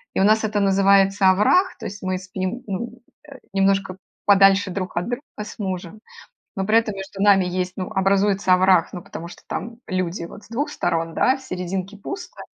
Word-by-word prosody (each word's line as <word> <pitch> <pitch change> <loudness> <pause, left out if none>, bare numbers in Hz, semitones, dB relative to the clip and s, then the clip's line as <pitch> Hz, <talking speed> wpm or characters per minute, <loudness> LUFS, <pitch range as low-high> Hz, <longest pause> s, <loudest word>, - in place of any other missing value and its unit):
И - - +1
у - - +4
нас 220 +2 +4
это 210 -1 0
называется 195 0 +4
овраг, 285 - +3
то - - -8
есть 200 +1 -7
мы 185 0 -1
спим, 185 +5 -5
ну, 235 +5 -5 0.3
э, 275 - -11 0.2
немножко 195 -1 +1 0.3
подальше 195 -1 +5
друг 185 -1 -4
от 175 - -1
друга 245 +2 -3 0.2
с 210 +1 -7
мужем, 190 0 -5 0.6
но 195 -1 -2
при 220 +2 +4
этом 215 -3 0
между 195 0 -7
нами 200 -2 +5
есть, 180 0 -2
ну, 185 +3 -4
образуется 195 -1 +2
овраг, 185 -2 +4
ну, 175 - -6
потому 170 +1 -8
что 175 - -13
там 230 +2 -5
люди 185 -1 -2
вот 195 +4 -10
с - - -22
2 265 +6 -2
сторон, 165 0 -2
да, 260 - +3
в - - -15
серединке 185 -2 -5
пусто. 360 - -8
195 Hz, 195 wpm, -22 LUFS, 185-210 Hz, 0.6 s, подальше